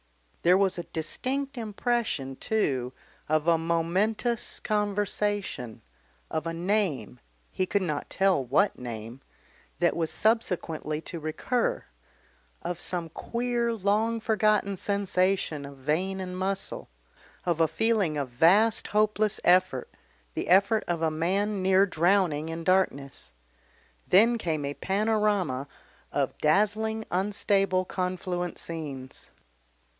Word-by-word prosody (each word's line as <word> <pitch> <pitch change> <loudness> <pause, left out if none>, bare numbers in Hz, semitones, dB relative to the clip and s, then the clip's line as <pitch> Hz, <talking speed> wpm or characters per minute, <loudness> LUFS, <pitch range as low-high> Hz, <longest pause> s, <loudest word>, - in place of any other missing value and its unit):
There 180 +2 +5
was 190 -2 +1
a - - -3
distinct 270 - -3
impression, 215 - -1
too, 130 - -1 0.4
of 155 +1 +1
a 165 -1 +4
momentous 185 +8 0
conversation, 205 - -2 0.5
of 160 +1 -2
a 165 - -2
name 175 - -1 0.3
he 185 - -1
could 200 0 +1
not 150 -5 -3
tell 190 -7 +2
what 150 +12 +2
name 115 +1 -7 0.6
that 175 0 +2
was 165 -2 -1
subsequently 170 -8 0
to 170 0 -7
recur, 160 +10 -1 0.8
of 175 -1 -3
some 175 -2 -3
queer 235 +6 -1
long 220 +3 +1
forgotten 215 -2 +2
sensation 190 -5 0
of 140 -1 -12
vein 170 +8 -1
and 180 -1 -5
muscle, 195 +1 -3 0.6
of 170 -2 +1
a 165 - +5
feeling 205 -7 +1
of 140 -3 -2
vast 190 - +4
hopeless 215 0 +1
effort, 180 -8 +3 0.4
the - - -3
effort 200 +4 +4
of 170 -2 -1
a 160 - +2
man 195 +6 0
near 190 +1 +5
drowning 175 -3 +1
in 165 0 -5
darkness. 140 - 0 0.7
Then 230 +5 +5
came 155 -7 -2
a 140 - -3
panorama 200 -8 0 0.4
of 140 -2 -1
dazzling 215 +6 +1
unstable 195 0 +1
confluent 180 -1 -3
scenes.... 140 -6 -6
185 Hz, 120 wpm, -27 LUFS, 160-210 Hz, 0.8 s, There